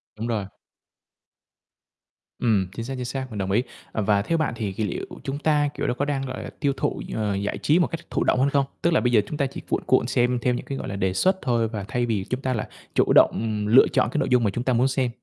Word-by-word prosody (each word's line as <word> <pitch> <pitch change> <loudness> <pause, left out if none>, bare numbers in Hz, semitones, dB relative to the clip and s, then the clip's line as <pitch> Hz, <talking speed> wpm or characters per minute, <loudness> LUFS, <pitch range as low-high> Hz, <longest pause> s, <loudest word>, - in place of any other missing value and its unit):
Đúng 110 +2 -4
rồi. 110 -4 -1 1.9
Ừm, 105 -6 +2
chính 115 +1 -4
xác, 135 - -4
chính 125 -1 -4
xác, 130 +1 -4
mình 105 - -6
đồng 95 -1 -2
ý. 115 +6 +3 0.3
Và 105 -1 +2
theo 165 +10 0
bạn 155 -6 0
thì 105 -3 -2
kỳ 110 - -2
liệu 100 - -3 0.2
chúng 135 +1 -3
ta, 150 -2 +2
kiểu, - - -3
đó - - +1
có 140 +3 -1
đang, 140 -2 -1
gọi 130 0 -5
là, - - -6
tiêu 140 -2 +1
thụ, - - -1
ờ, 105 -3 0
giải 100 +1 -2
trí 155 +4 +3
một 175 - +3
cách 165 - -5
thụ - - 0
động - - +2
hơn 135 +2 +3
không? 140 -1 +2 0.2
Tức 170 - +2
là - - +4
bây 125 - +1
giờ 110 -3 +5
chúng 150 - -5
ta 140 - +1
chỉ 135 - -6
cuộn - - 0
cuộn 130 -2 +3
xem 125 -1 +1
theo 125 +1 +1
những - - -4
cái, 135 - -4
gọi - - -5
là, 100 - -4
đề 95 -1 0
xuất 185 - +2
thôi 115 -3 +1
và 105 -3 -5
thay 120 -1 0
vì 105 -5 -1
chúng 130 +1 -2
ta 130 -1 0
là 110 - -3 0.3
chủ - - +3
động, - - +8
ừm, 110 -2 -2
lựa 120 +5 +7
chọn - - +1
cái - - -1
nội - - 0
dung 125 -2 +4
mà 105 - +3
chúng 120 +5 -3
ta 130 - +1
muốn 125 +3 +3
xem? 130 -2 0
125 Hz, 285 wpm, -24 LUFS, 110-135 Hz, 1.9 s, động